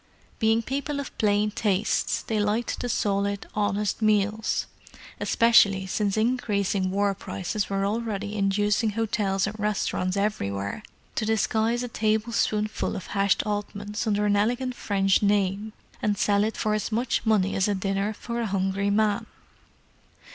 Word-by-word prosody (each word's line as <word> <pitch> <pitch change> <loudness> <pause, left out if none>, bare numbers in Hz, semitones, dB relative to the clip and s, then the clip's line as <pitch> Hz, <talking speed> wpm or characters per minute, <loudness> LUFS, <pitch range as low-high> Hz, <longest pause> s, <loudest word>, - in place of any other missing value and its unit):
Being 225 0 +3
people 280 +3 -3
of 280 - -6
plain 210 0 +2
tastes 210 -2 0
they 220 -2 -1
liked 210 +3 0
the 245 - -3
solid, 200 -2 0
honest 205 0 -1
meals—especially 215 0 +1
since 200 +1 -1
increasing 205 -5 0
War 200 +1 +1
prices 195 +1 -4
were 195 0 0
already 210 -1 -2
inducing 205 +2 +1
hotels 205 -3 0
and 210 +2 -4
restaurants 200 -2 -1
everywhere 100 - -2 0.3
to - - -1
disguise 220 +2 +1
a - - -3
tablespoonful 215 -1 0
of 190 - -6
hashed 200 -1 +2
oddments 205 0 -3
under 210 -1 +1
an 205 0 +3
elegant 245 +5 0
French 195 -4 +1
name 205 +1 +1 0.3
and 205 -1 +1
sell 205 0 +2
it 220 +1 -2
for 215 - 0
as 215 +1 -2
much 235 +2 0
money 210 -4 +2
as 195 - +2
a 205 - +1
dinner 195 +2 -1
for 235 +2 -4
a 230 - -1
hungry 195 0 0
man. 205 0 +1
210 Hz, 140 wpm, -26 LUFS, 200-220 Hz, 0.3 s, Being